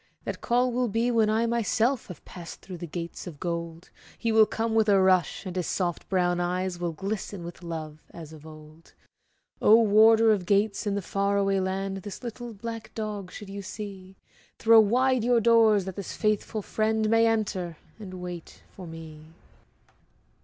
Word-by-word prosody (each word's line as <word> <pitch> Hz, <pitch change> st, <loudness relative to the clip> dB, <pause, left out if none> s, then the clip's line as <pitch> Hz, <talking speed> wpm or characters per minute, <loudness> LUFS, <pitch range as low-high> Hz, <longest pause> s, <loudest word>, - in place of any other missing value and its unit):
That -, -, -5 dB
call 245 Hz, +1 st, +2 dB
will 250 Hz, +1 st, 0 dB
be 230 Hz, +3 st, 0 dB
when 225 Hz, -2 st, +3 dB
I, 220 Hz, +2 st, +2 dB
myself, 235 Hz, +2 st, 0 dB
Have 180 Hz, -, -11 dB
passed 170 Hz, -2 st, -10 dB
through 185 Hz, -2 st, -9 dB
the 175 Hz, -, -6 dB
Gates 170 Hz, +2 st, -6 dB
of 155 Hz, -5 st, -9 dB
Gold; 170 Hz, -1 st, -5 dB, 0.3 s
He 230 Hz, -, -1 dB
will 220 Hz, -1 st, +6 dB
come 225 Hz, 0 st, -2 dB
with 220 Hz, -1 st, +3 dB
a 200 Hz, -1 st, +5 dB
rush, 185 Hz, -1 st, +2 dB
and 185 Hz, -1 st, -6 dB
his 180 Hz, -3 st, -2 dB
soft 175 Hz, -3 st, -2 dB
brown 175 Hz, -2 st, +1 dB
eyes 180 Hz, 0 st, -2 dB
Will 175 Hz, -1 st, -2 dB
glisten 195 Hz, +1 st, -5 dB
with 170 Hz, +1 st, -9 dB
love 160 Hz, -3 st, -6 dB
as 160 Hz, -2 st, -11 dB
of 155 Hz, -2 st, -13 dB
old. 155 Hz, +1 st, -14 dB, 0.7 s
Oh, 220 Hz, +2 st, +7 dB
Warder 220 Hz, +1 st, +6 dB
of 190 Hz, -5 st, 0 dB
Gates, 205 Hz, +1 st, +1 dB
in 200 Hz, -, 0 dB
the 200 Hz, -, -3 dB
far 200 Hz, +2 st, 0 dB
away 195 Hz, -1 st, +2 dB
land, 195 Hz, +1 st, -2 dB
This 195 Hz, +5 st, -8 dB
little 240 Hz, 0 st, -6 dB
black 225 Hz, +1 st, -7 dB
dog 210 Hz, -4 st, -5 dB
should 205 Hz, +1 st, -9 dB
you 200 Hz, 0 st, -6 dB
see, 195 Hz, -2 st, -8 dB, 0.4 s
Throw 225 Hz, 0 st, +6 dB
wide 250 Hz, +3 st, +3 dB
your 240 Hz, 0 st, +3 dB
doors 225 Hz, -4 st, +4 dB
that 190 Hz, -2 st, -6 dB
this 200 Hz, -, -6 dB
faithful 215 Hz, 0 st, -1 dB
friend 220 Hz, +1 st, 0 dB
May 225 Hz, +1 st, +4 dB
enter, 195 Hz, -7 st, -1 dB, 0.2 s
and 190 Hz, -3 st, -8 dB
wait 180 Hz, -2 st, -8 dB
for 185 Hz, -2 st, -9 dB
me. 160 Hz, -1 st, -10 dB
200 Hz, 180 wpm, -27 LUFS, 175-220 Hz, 0.7 s, Oh